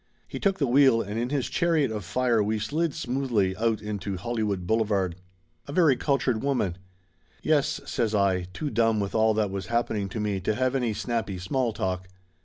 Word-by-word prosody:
He -, -, -6 dB
took 195 Hz, -2 st, +1 dB
the 145 Hz, -, +1 dB
wheel 130 Hz, -2 st, +5 dB
and 105 Hz, +3 st, -4 dB
in 120 Hz, -, 0 dB
this 140 Hz, -1 st, -1 dB
chariot 160 Hz, -7 st, +1 dB
of 105 Hz, -2 st, -4 dB
fire 115 Hz, +4 st, +1 dB
we 105 Hz, +1 st, 0 dB
slid 155 Hz, +8 st, -1 dB
smoothly 125 Hz, -10 st, 0 dB
out 110 Hz, +1 st, 0 dB
into 100 Hz, -2 st, -4 dB
Hollywood 105 Hz, -3 st, -2 dB
Boulevard. 100 Hz, -4 st, +1 dB, 0.5 s
"A -, -, -6 dB
very 155 Hz, -4 st, +4 dB
cultured 130 Hz, -5 st, 0 dB
woman." 105 Hz, -11 st, 0 dB, 0.6 s
"Yes," 150 Hz, -1 st, +2 dB
says 110 Hz, -3 st, -1 dB
I, 95 Hz, -3 st, +2 dB
too 150 Hz, +9 st, -4 dB
dumb 115 Hz, -1 st, +2 dB
with 100 Hz, -1 st, -2 dB
all 110 Hz, -1 st, +3 dB
that 105 Hz, -3 st, 0 dB
was 100 Hz, 0 st, -4 dB
happening 110 Hz, -4 st, -1 dB
to 110 Hz, -, -5 dB
me 105 Hz, -2 st, -1 dB
to 100 Hz, +4 st, -1 dB
have 130 Hz, +2 st, +1 dB
any 120 Hz, -5 st, 0 dB
snappy 115 Hz, -4 st, -2 dB
small 115 Hz, +7 st, -1 dB
talk. 95 Hz, -3 st, -3 dB
110 Hz, 190 wpm, -26 LUFS, 100-130 Hz, 0.6 s, wheel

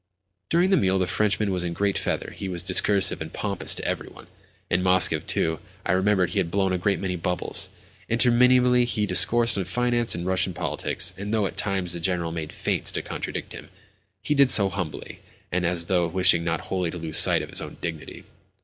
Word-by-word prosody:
During 175 Hz, +3 st, +2 dB
the -, -, +4 dB
meal 95 Hz, -1 st, +1 dB
the 95 Hz, -, 0 dB
Frenchman 105 Hz, +2 st, 0 dB
was 90 Hz, -1 st, -1 dB
in 85 Hz, -1 st, -3 dB
great 100 Hz, +2 st, -1 dB
feather: -, -, -3 dB
he 95 Hz, -, -6 dB
was 90 Hz, -2 st, -4 dB
discursive 100 Hz, -3 st, +2 dB
and 80 Hz, 0 st, -6 dB
pompous 100 Hz, 0 st, -1 dB
to -, -, -6 dB
every -, -, -3 dB
one. -, -, -15 dB, 0.4 s
In 85 Hz, -, 0 dB
Moscow 90 Hz, -4 st, +4 dB
too, 80 Hz, +1 st, -2 dB, 0.3 s
I -, -, 0 dB
remembered, 95 Hz, -1 st, +1 dB
he 100 Hz, -, -1 dB
had 90 Hz, -3 st, -1 dB
blown 95 Hz, +1 st, 0 dB
a 90 Hz, -, -1 dB
great 100 Hz, +2 st, 0 dB
many 95 Hz, -2 st, -3 dB
bubbles. 90 Hz, 0 st, -1 dB, 0.4 s
Interminably 125 Hz, +1 st, +3 dB
he 110 Hz, -3 st, -1 dB
discoursed 115 Hz, +4 st, +4 dB
on 95 Hz, -, -3 dB
finance 120 Hz, +2 st, -1 dB
and 85 Hz, -, -5 dB
Russian 95 Hz, -1 st, -1 dB
politics, 90 Hz, 0 st, -3 dB
and 100 Hz, +2 st, -6 dB
though, 110 Hz, -2 st, +1 dB
at -, -, -5 dB
times, 95 Hz, -4 st, 0 dB
the 85 Hz, -, -3 dB
General 85 Hz, -1 st, -1 dB
made 80 Hz, -2 st, -6 dB
feints -, -, 0 dB
to -, -, -3 dB
contradict -, -, -6 dB
him, -, -, -11 dB, 0.5 s
he 150 Hz, -, 0 dB
did 140 Hz, -2 st, +4 dB
so 100 Hz, -5 st, +6 dB
humbly, 90 Hz, -6 st, -6 dB, 0.3 s
and 90 Hz, 0 st, 0 dB
as 85 Hz, -1 st, -2 dB
though 90 Hz, -2 st, +1 dB
wishing 85 Hz, -1 st, +3 dB
not 85 Hz, -1 st, -2 dB
wholly 90 Hz, -3 st, -3 dB
to 90 Hz, -, -7 dB
lose 80 Hz, -2 st, +3 dB
sight -, -, +3 dB
of -, -, -10 dB
his -, -, -1 dB
own -, -, -9 dB
dignity. 80 Hz, -2 st, -7 dB
95 Hz, 210 wpm, -24 LUFS, 85-105 Hz, 0.5 s, so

